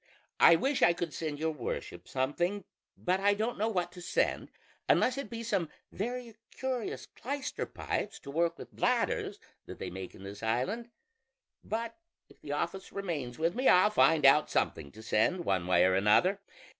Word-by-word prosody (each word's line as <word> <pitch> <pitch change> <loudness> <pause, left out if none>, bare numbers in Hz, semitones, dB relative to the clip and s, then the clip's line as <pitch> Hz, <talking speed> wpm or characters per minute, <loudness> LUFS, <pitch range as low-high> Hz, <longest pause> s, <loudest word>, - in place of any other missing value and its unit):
I 170 - +8
wish 270 - 0
I 170 0 +6
could 170 -2 -4
send 155 -3 -3
your 160 +2 0
worship 140 -7 -5
something; 175 +10 -1 0.3
but 185 +1 0
I 205 +1 +3
don't 220 +2 -2
know 220 +2 +1
what 180 -5 -1
to 180 - -11
send, - - 0 0.4
unless 255 - +4
it 275 -5 -5
be 230 +1 -5
some 195 -8 0 0.2
very 235 +1 -5
curious 260 -3 -4
clyster 280 +2 -4
pipes - - -3
to 140 - -8
work 170 +2 +1
with - - -11
bladders, - - 0 0.3
that - - -8
they 90 - -5
make 95 0 -7
in 95 - -12
this 100 +1 -8
island; 130 - -1 0.7
but 230 +4 -4 0.3
if - - -21
the 145 - -7
office 170 +6 -3
remains 155 -11 -4
with 165 +2 +1
me 255 +2 0
I'll 185 +4 +6
find 160 -7 +4
out 150 +3 +6
something 70 - -1
to 110 - -12
send, 165 +12 +1
one 95 -2 0
way 90 - +5
or 95 - +3
another. 105 - +4
175 Hz, 180 wpm, -31 LUFS, 135-215 Hz, 0.7 s, I